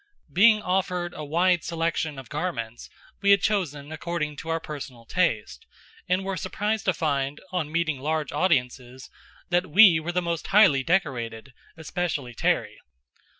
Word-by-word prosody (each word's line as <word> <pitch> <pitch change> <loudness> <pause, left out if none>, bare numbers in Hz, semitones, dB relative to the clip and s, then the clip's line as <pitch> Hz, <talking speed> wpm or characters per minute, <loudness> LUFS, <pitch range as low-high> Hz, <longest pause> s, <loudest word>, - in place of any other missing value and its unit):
Being 215 +3 +5
offered 180 -1 -1
a 155 - -7
wide 175 +3 +2
selection 165 -3 -2
of 135 - -9
garments, 125 -8 -4 0.3
we 200 - +2
had 200 -1 +5
chosen 155 -8 -1
according 155 -1 -3
to 165 - -7
our 165 0 0
personal 135 -7 -8
taste, 115 - -1 0.4
and 185 +1 +1
were 195 0 -2
surprised 210 +4 -2
to 185 - +2
find, 140 -2 -1
on 165 -5 -2
meeting 155 -4 0
large 155 +2 -2
audiences, 130 -6 -1 0.4
that 175 +1 +2
we 185 -1 +7
were 160 +2 -4
the 180 - 0
most 170 -2 -3
highly 190 -10 +5
decorated, 130 -7 -2 0.2
especially 160 -5 -3
Terry. - - -1
165 Hz, 150 wpm, -25 LUFS, 140-180 Hz, 0.4 s, we